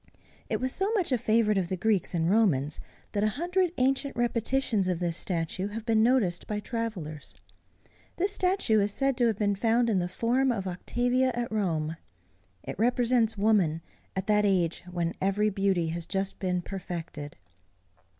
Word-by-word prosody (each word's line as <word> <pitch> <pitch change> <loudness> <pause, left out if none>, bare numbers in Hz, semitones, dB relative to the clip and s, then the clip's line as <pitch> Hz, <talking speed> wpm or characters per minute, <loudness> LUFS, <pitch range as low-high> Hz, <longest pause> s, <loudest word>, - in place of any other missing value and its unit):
It - - 0
was 260 0 -1
so 390 +3 0
much 375 -9 0
a 255 - +3
favorite 215 -2 +2
of 175 -2 -2
the 185 - -2
Greeks 200 -2 +1
and 165 -1 +1
Romans, 170 -9 +2 0.3
that 205 - 0
a - - +4
hundred 355 +2 +1
ancient 270 +2 +1
repetitions 235 -3 0
of 180 -2 0
this 170 -1 -2
statue 180 +2 -2
have 215 +2 -6
been 225 -2 +3
noticed 225 -7 +2
by 210 -1 -2
travellers. 205 - -5 0.8
This 385 +3 +1
statue 365 - +2
is 205 0 +1
said 275 +4 +1
to 240 -2 +3
have 220 -3 0
been 205 -1 +1
found 230 +3 +2
in 195 - +2
the 175 - -1
forum 245 +8 +1
of 200 -5 -2
Octavia 245 +8 0
at 240 -1 -3
Rome. 165 -7 -1 0.7
It - - -7
represents 240 -1 +2
woman 195 -7 +2 0.3
at 190 0 -2
that 210 0 +3
age 180 -5 +1
when 175 -1 -2
every 210 +2 +2
beauty 190 -4 +1
has 170 0 -5
just 195 0 -2
been 180 -2 -1
perfected. 170 -6 -6
210 Hz, 170 wpm, -28 LUFS, 180-240 Hz, 0.8 s, a